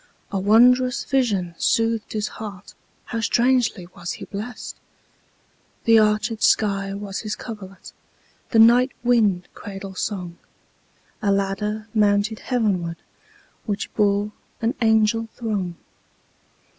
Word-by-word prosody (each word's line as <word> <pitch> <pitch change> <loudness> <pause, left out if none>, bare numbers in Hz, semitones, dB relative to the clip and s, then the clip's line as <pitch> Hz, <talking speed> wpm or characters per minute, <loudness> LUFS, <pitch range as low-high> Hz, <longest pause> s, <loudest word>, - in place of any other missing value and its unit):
A 195 - -1
wondrous 250 +5 +4
vision 205 -10 0
soothed 225 -1 +1
his 210 -1 -1
heartHow 210 +2 -8
strangely 240 -5 +2
was 175 0 -5
he - - -8
blessed! 215 +5 -7 1.1
The 225 -1 +6
arched 215 +1 +1
sky 195 -2 +2
was 200 -1 -5
his 215 -2 -4
coverlet, 195 -5 -9 0.6
The 230 - +1
night 240 +3 +6
wind 215 -7 +2
cradle 195 -1 -8
song;A 190 +2 -6
ladder 210 +2 -1
mounted 210 0 +2
heavenwardWhich 200 -1 -4
bore 205 0 +2 0.3
an 230 +2 0
angel 220 0 +3
throng. 200 -7 -3
210 Hz, 100 wpm, -23 LUFS, 195-230 Hz, 1.1 s, The